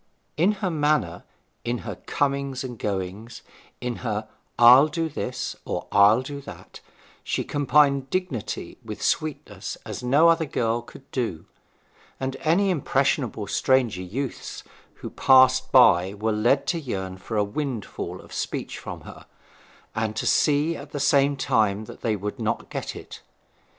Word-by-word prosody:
In 180 Hz, +7 st, +3 dB
her 185 Hz, -, 0 dB
manner, 145 Hz, -, 0 dB, 0.4 s
in 120 Hz, +1 st, -1 dB
her -, -, -4 dB
comings 140 Hz, -2 st, -2 dB
and 125 Hz, -4 st, -7 dB
goings, 100 Hz, +3 st, -4 dB, 0.4 s
in 125 Hz, -1 st, -3 dB
her 110 Hz, -3 st, -3 dB, 0.3 s
'I'll 125 Hz, +5 st, +8 dB
do 165 Hz, +1 st, -2 dB
this,' 130 Hz, -4 st, -4 dB
or -, -, -4 dB
'I'll 105 Hz, +5 st, +5 dB
do 140 Hz, +1 st, -7 dB
that,' -, -, -11 dB, 0.4 s
she -, -, -1 dB
combined 140 Hz, -1 st, +2 dB
dignity 180 Hz, -, -3 dB
with -, -, -7 dB
sweetness 155 Hz, -1 st, -2 dB
as -, -, -6 dB
no 140 Hz, +7 st, +4 dB
other 165 Hz, -1 st, +2 dB
girl 115 Hz, -2 st, 0 dB
could 130 Hz, +3 st, -15 dB
do; 110 Hz, -11 st, -3 dB, 0.7 s
and 130 Hz, 0 st, -3 dB
any 185 Hz, +7 st, +2 dB
impressionable 135 Hz, -, 0 dB
stranger 120 Hz, -2 st, +1 dB
youths 120 Hz, +9 st, -5 dB, 0.3 s
who -, -, -8 dB
passed 130 Hz, -1 st, +5 dB
by 95 Hz, -7 st, +5 dB
were 110 Hz, +2 st, -1 dB
led 115 Hz, +6 st, +2 dB
to 170 Hz, -, 0 dB
yearn 95 Hz, -10 st, -4 dB
for 110 Hz, +4 st, -5 dB
a 105 Hz, -, +3 dB
windfall 115 Hz, +1 st, -4 dB
of -, -, -15 dB
speech -, -, -4 dB
from -, -, -7 dB
her, -, -, -12 dB, 0.7 s
and 110 Hz, 0 st, -2 dB
to 110 Hz, -, -2 dB
see 150 Hz, +2 st, +2 dB
at 145 Hz, -1 st, -10 dB
the 145 Hz, -, -3 dB
same 140 Hz, 0 st, +3 dB
time 110 Hz, -5 st, +1 dB
that -, -, -12 dB
they 110 Hz, -2 st, 0 dB
would 105 Hz, +1 st, -5 dB
not -, -, -2 dB
get -, -, -4 dB
it. -, -, -10 dB
130 Hz, 150 wpm, -25 LUFS, 110-145 Hz, 0.7 s, I'll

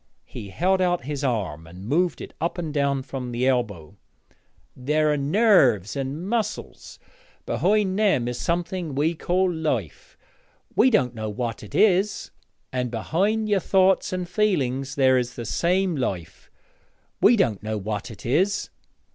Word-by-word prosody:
he 100 Hz, -, -9 dB
held 185 Hz, -, +1 dB
out 175 Hz, -4 st, +1 dB
his 145 Hz, +1 st, -4 dB
arm 95 Hz, -, -2 dB
and 90 Hz, +3 st, -11 dB
moved 175 Hz, +6 st, +1 dB
it -, -, -9 dB
up 170 Hz, +2 st, -1 dB
and 165 Hz, -4 st, -4 dB
down 140 Hz, -2 st, 0 dB
from 130 Hz, -2 st, -6 dB
the 120 Hz, +2 st, -1 dB
elbow 105 Hz, -10 st, -1 dB, 0.8 s
'there 150 Hz, +4 st, +1 dB
are -, -, 0 dB
nerves 140 Hz, -, +3 dB
and 140 Hz, +6 st, -4 dB
muscles; 215 Hz, -1 st, -3 dB, 0.5 s
behind 200 Hz, 0 st, +1 dB
them 190 Hz, -, +2 dB
is 125 Hz, 0 st, -4 dB
something 170 Hz, -2 st, -2 dB
we 155 Hz, +4 st, +1 dB
call 180 Hz, +2 st, 0 dB
life 160 Hz, -1 st, -3 dB, 0.6 s
we 260 Hz, -, +5 dB
don't 130 Hz, -, +2 dB
know 110 Hz, -2 st, -4 dB
what 115 Hz, +1 st, -4 dB
it 105 Hz, -, -10 dB
is. 200 Hz, 0 st, +2 dB, 0.4 s
And 125 Hz, -1 st, -1 dB
behind 195 Hz, -, 0 dB
your 205 Hz, -2 st, +2 dB
thoughts 190 Hz, +1 st, +2 dB
and 185 Hz, -1 st, -3 dB
feeling 170 Hz, -, 0 dB
there 130 Hz, -2 st, +4 dB
is 125 Hz, 0 st, -4 dB
the 120 Hz, -, -6 dB
same 180 Hz, -, +1 dB
life 90 Hz, -, -4 dB, 0.7 s
we 240 Hz, -, +6 dB
don't 115 Hz, -, +1 dB
know 110 Hz, 0 st, -3 dB
what 105 Hz, 0 st, -4 dB
it 110 Hz, -, -11 dB
is. 185 Hz, +11 st, +1 dB
145 Hz, 155 wpm, -24 LUFS, 120-185 Hz, 0.8 s, we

